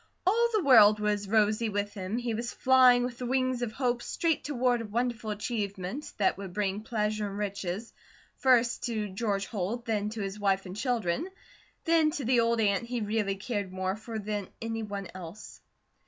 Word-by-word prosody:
All 465 +5 +3
the 425 -4 +2
world 215 -6 +7
was 210 -1 0
rosy 215 +1 +2
with 205 0 -2
him, 200 +2 -3
he 240 -1 -2
was 235 +2 -3
flying 255 -2 +5
with 245 -1 -4
the 250 - -3
wings 255 -1 0
of 240 -3 -2
hope 245 0 -1
straight 325 +3 0
toward 250 -4 +1
a - - -5
wonderful 230 0 -2
achievement 210 +2 -4
that 195 -1 +1
would 195 -3 -7
bring 200 0 -1
pleasure 215 -1 -1
and 200 0 -6
riches, 200 +1 -4 0.4
first 245 -2 +3
to 215 -4 -2
George 200 0 -1
Holt, 220 +4 -3
then 210 -2 -1
to 220 0 -5
his 195 +1 -4
wife 195 -1 +1
and 185 0 -7
children, 240 - -1 0.6
then 325 -2 +4
to 300 -5 -4
the 245 0 +3
old 230 0 +2
aunt 205 0 +2
he 240 0 -3
really 210 -2 0
cared 200 -1 -3
more 185 0 -2
for 220 +1 -7
than 205 -2 -3
any 225 0 -3
one 200 -3 -5
else. 185 +2 -10
215 Hz, 185 wpm, -29 LUFS, 200-245 Hz, 0.6 s, world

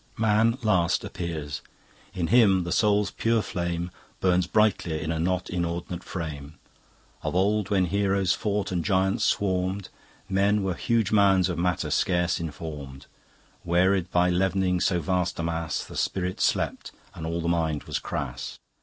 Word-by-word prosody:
Man 110 +2 +3
last 90 -6 +2
appears. 75 -5 -5 0.5
In 90 -2 -2
him 100 -6 +5
the 85 - -4
Soul's 105 -1 +2
pure 115 -1 +1
flame 85 -2 -3 0.3
Burns 90 -1 +2
brightlier 105 -7 +2
in 80 +1 -3
a 80 - -2
not 90 +2 0
inord'nate 85 0 -3
frame. 80 -5 -6 0.7
Of - - -3
old 100 +1 +2
when 95 -3 +3
Heroes 100 0 +1
fought 105 -2 -2
and 90 -2 -1
Giants 95 0 +1
swarmed, 95 0 0 0.4
Men 100 +2 +2
were 95 -1 0
huge 115 +3 0
mounds 95 -3 +4
of 90 - -3
matter 90 -1 0
scarce 90 -1 +1
inform'd; 75 -4 -7 0.6
Wearied 90 +1 +2
by 90 0 +3
leavening 95 0 +1
so 90 -2 +2
vast 90 0 -1
a 85 - -2
mass, 80 -1 -2
The - - -11
spirit 90 -1 -2
slept - - 0 0.2
and 80 - -8
all 85 +1 -2
the 85 - -2
mind 80 -3 0
was - - -3
crass. 65 -4 -5
90 Hz, 155 wpm, -26 LUFS, 85-100 Hz, 0.7 s, him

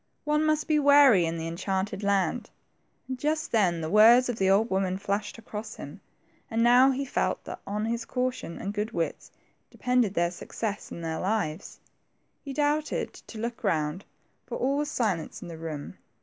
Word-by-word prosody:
One 300 +1 +1
must 310 0 +1
be 305 -1 +3
wary 280 - +6
in 165 +1 -3
the 160 - -4
en 165 +1 -5
chanted 195 +1 -2
land, 200 +2 0 0.6
and 260 -1 -5
just 310 +2 -1
then 180 -7 +2
the 160 - -3
words 235 +4 +7
of 240 - -2
the 190 0 +3
old 210 +4 +3
woman 190 -1 0
flashed 200 +2 -3
across 215 -1 -7
him, - - -9 0.5
and 225 0 +1
now 250 +3 +6
he 270 +1 -1
felt 270 - -1
that - - -8
on 210 +2 -2
his 235 +1 -2
caution 250 -8 -3
and 200 - -4
good 210 +2 -3
wits 165 -1 -3 0.4
depended 250 -5 +1
their 170 0 +1
success 205 +3 -5
and 170 - -7
their 160 0 -2
lives. 190 -4 -2 0.6
He 280 - -6
doubted 295 +2 0
to 225 - -12
look 235 +3 -5
round, 160 -1 0 0.4
for - - -4
all 275 +2 0
was 295 0 -1
silence 200 - -2
in - - -8
the 165 - -7
room. 155 -3 -6
215 Hz, 185 wpm, -27 LUFS, 185-255 Hz, 0.6 s, words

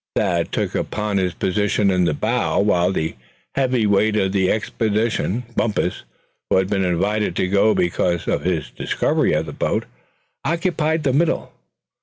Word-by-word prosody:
Thad 85 -5 0
took - - -2
up - - -3 0.2
his 90 -2 -1
position 100 +1 +1
in 90 -1 +2
the 75 - +1
bow, - - 0
while 90 -3 +2
the 80 -3 -2 0.4
heavy 130 -4 +1
weight 105 +1 +3
of 95 -3 +1
the 95 -2 +2
expedition, 110 +1 -1
Bumpus, 100 - -1 0.4
who - - +3
had 95 0 +1
been 95 -2 +1
invited 95 +2 0
to 90 - 0
go 100 +3 +3
because 85 -1 0
of - - 0
his 85 -4 -1
discovery - - 0
of 75 +1 0
the 75 - -7
boat, - - -1 0.6
occupied 165 -2 0
the 135 - +1
middle. 160 +4 0
100 Hz, 160 wpm, -21 LUFS, 90-110 Hz, 0.6 s, weight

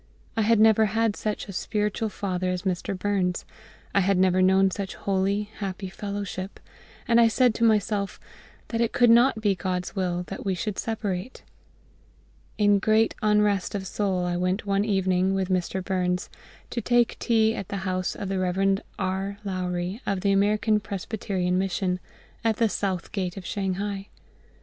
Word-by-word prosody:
I 225 - +1
had 220 +1 +4
never 220 0 +6
had 220 0 +1
such 215 0 -3
a 195 - -7
spiritual 210 +3 -1
father 185 -3 -2
as 180 0 -2
Mr. 185 0 -2
Burns; 185 -2 0 0.5
I - - +4
had 195 0 +2
never 185 0 +3
known 190 +1 +4
such 195 0 -4
holy, 200 +2 -1
happy 195 -1 -4
fellowship; 200 -1 -5 0.5
and 235 -1 +5
I 230 - +6
said 245 +1 +3
to 230 - -2
myself 210 -2 +1 0.5
that 230 0 -1
it 230 - +1
could 240 -1 +5
not 235 0 +5
be 205 -2 +3
GOD'S 180 0 -3
will 180 -2 -1
that 195 - -7
we 195 -2 0
should 200 +2 -3
separate. 215 0 -3 1.1
In 205 -1 +4
great 220 +2 +3
unrest 210 -2 +2
of 195 -1 -3
soul 190 -2 -1
I 175 0 -1
went 185 +4 -1
one 200 0 +1
evening, 190 -2 +1
with 190 -1 -1
Mr. 185 0 -1
Burns, 180 -1 -1 0.4
to 235 - -2
take 240 -1 +2
tea 220 -2 +3
at 200 -5 -5
the 200 - -3
house 185 -1 -1
of 200 - -5
the 190 0 -1
Rev. 195 +2 +1 0.2
R. 190 +1 -2
Lowrie, 185 +2 -3
of 195 -2 0
the 200 - +2
American 210 +2 +3
Presbyterian 195 -3 -2
Mission, 185 -1 -1 0.4
at 225 -1 +2
the 230 -2 +3
South 190 -4 -2
Gate 185 -3 -3
of 190 - -7
Shanghai. 195 +1 -3
195 Hz, 170 wpm, -26 LUFS, 185-210 Hz, 1.1 s, never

